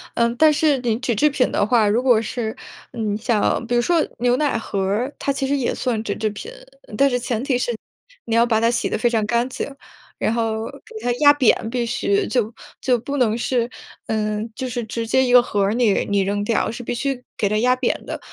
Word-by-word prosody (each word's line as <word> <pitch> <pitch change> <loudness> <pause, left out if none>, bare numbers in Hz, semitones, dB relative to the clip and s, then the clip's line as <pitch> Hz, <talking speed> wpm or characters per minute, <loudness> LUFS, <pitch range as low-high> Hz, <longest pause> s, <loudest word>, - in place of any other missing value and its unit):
呃， 235 0 +2
但 315 +2 +6
是 295 -1 +2
你 235 -3 0
纸 250 -2 -1
制 300 +9 +3
品 275 -3 +1
的 - - +1
话， 220 -1 +3
如 225 +5 +1
果 245 -4 +4
是， 225 0 -3 0.4
嗯， 215 -3 -2
像 225 +1 0
比 245 - -2
如 240 - +4
说 335 +5 +2
牛 245 +1 +3
奶 285 -2 0
盒 210 -3 -4
儿， 210 +9 -1
它 280 - -1
其 275 -1 -2
实 280 - +1
也 265 -4 0
算 230 -4 -2
纸 205 - -2
制 215 0 -1
品。 210 - -8 0.5
但 275 0 +4
是 245 - 0
前 240 -2 -2
提 265 -2 +1
是 245 - -1 0.5
你 230 - -1
要 230 +1 +5
把 225 -2 +2
它 230 +1 +3
洗 240 - -1
得 - - -1
非 240 +3 +2
常 225 -3 0
干 235 +3 +1
净， 265 +2 -5 0.5
然 220 - +1
后 225 -1 -1
给 460 - -14
它 245 - +2
压 290 -1 +8
扁 255 -5 +2
必 240 0 -1
须， 400 - 0
就 235 -3 0 0.3
就 250 -2 +2
不 280 +5 -5
能 230 -4 +2
是 240 0 0 0.4
呃， 215 -1 -1 0.2
就 260 - -3
是 245 -1 -3
直 230 +1 -4
接 260 +3 +3
一 250 - 0
个 245 0 +8
盒 210 -4 -2
儿 200 +2 +1
你 230 -4 +2
你 200 0 +2
扔 200 +1 -1
掉， 225 +2 0
是 240 +2 -7
必 245 - -3
须 255 +1 -3
给 205 - +1
它 215 - +1
压 250 +2 +3
扁 - - -1
的。 - - -5
240 Hz, 255 characters per minute, -21 LUFS, 220-255 Hz, 0.5 s, 压